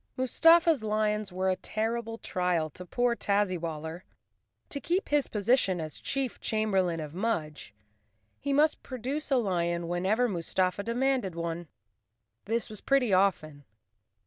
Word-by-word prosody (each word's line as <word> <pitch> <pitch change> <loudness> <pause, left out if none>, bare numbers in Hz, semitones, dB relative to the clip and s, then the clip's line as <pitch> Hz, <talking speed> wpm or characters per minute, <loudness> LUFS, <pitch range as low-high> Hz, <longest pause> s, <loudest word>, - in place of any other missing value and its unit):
Mustafa's 325 +2 +4
lions 215 -1 0
were 185 +1 0
a - - +1
terrible 225 +3 -2
trial 180 -6 -1
to 180 +4 -11
poor 245 +4 +1
Tazzy 200 -3 +1
waller. 160 +1 -5 0.7
To 285 - -2
keep 360 +7 -1
his 290 -1 +2
position 205 -3 +2
as 155 -2 -5
chief 270 -3 -1
chamberlain 195 -6 0
of 150 -1 -6
Mudge, 165 - -3 0.7
he 280 - -2
must 300 +3 +3
produce 260 +5 -4
a 270 - +3
lion 170 -6 0
whenever 190 +8 +1
Mustafa 185 0 -1
de¬ 230 +2 -3
manded 260 -9 +1
one. 170 0 -4 0.8
This 230 +2 -1
was 215 -2 -9
pretty 265 -6 +2
often. 155 -7 +1
205 Hz, 140 wpm, -29 LUFS, 175-245 Hz, 0.8 s, Mustafa's